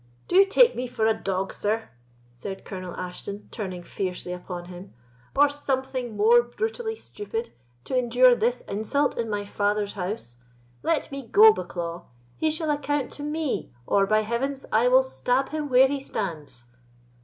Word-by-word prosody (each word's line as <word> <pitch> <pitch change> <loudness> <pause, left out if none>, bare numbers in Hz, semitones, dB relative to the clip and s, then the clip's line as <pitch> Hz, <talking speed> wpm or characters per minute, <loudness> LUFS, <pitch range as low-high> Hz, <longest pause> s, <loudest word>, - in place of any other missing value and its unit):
"Do - - -2
you 390 +1 +8
take 475 +5 +5
me 250 +1 -3
for 225 -2 -1
a 220 - +4
dog, 195 -3 -2
sir" 220 +2 -1 0.4
said 190 +11 -7
Colonel 185 -2 -6
Ashton, 185 +3 -6
turning 185 -5 -5
fiercely 180 -1 -4
upon 180 -1 -7
him, 180 +2 -11 0.4
"or 290 +1 +6
something 265 -5 -3
more 230 +3 +6
brutally 445 - -3
stupid, 450 +2 -6 0.3
to 260 - -3
endure 250 0 +5
this 240 +1 +1
insult 220 +8 0
in 230 -1 -2
my 205 -1 -2
father's 205 0 0
house? 180 - -5 0.4
Let 325 -3 0
me 275 0 -5
go, 435 - +8
Bucklaw! 175 - -5 0.3
He 315 - +1
shall 310 0 -1
account 290 -1 -1
to - - -9
me, 300 -1 -2
or, 195 +7 +3
by 215 +1 +3
Heavens, 260 +5 -2
I 225 +3 +4
will 260 +1 +6
stab 260 0 0
him 305 -1 -3
where 260 +1 +6
he 280 +1 -2
stands!" 155 - -4
235 Hz, 165 wpm, -26 LUFS, 195-280 Hz, 0.4 s, you